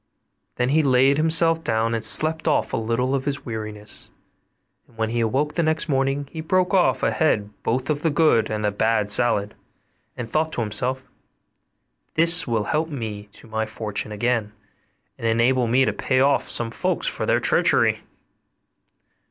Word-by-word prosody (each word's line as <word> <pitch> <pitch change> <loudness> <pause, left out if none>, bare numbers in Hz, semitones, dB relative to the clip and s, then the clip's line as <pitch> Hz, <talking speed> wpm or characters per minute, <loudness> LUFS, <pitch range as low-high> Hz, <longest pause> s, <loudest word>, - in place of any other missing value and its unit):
Then 125 +1 0
he 155 +3 +3
laid 135 0 +3
himself 165 +1 +2
down 115 -3 0
and 115 0 -2
slept 155 +8 +1
off - - +1
a - - +1
little 115 +4 -1
of 135 -1 -1
his 140 -1 -3
weariness; 105 -2 -4 0.8
and 115 - -24
when 110 0 -1
he 120 - -1
awoke 135 +7 0
the 170 - 0
next 160 0 0
morning 135 0 0
he 160 - -6
broke 185 +4 +1
off 185 -2 +2
a - - +2
head 105 -10 0
both 125 +3 -1
of 150 -1 -1
the 165 - +1
good 150 -8 +3
and 105 -1 -2
the 105 - +1
bad 105 0 0
salad, 105 -3 +1 0.6
and 120 - -5
thought 155 +6 0
to - - -1
himself, 125 +5 -1 1.1
'This 165 +1 +4
will 115 -3 0
help 155 +8 -1
me 110 -8 -5
to - - -14
my 110 0 -2
fortune 105 -1 -5
again, 110 -1 -1 0.7
and 115 - -2
enable 120 +2 +2
me 130 +3 +3
to - - 0
pay 130 -1 0
off 140 +1 +2
some 115 -1 -3
folks - - -2
for - - -2
their - - +3
treachery. - - +2
125 Hz, 175 wpm, -23 LUFS, 110-150 Hz, 1.1 s, This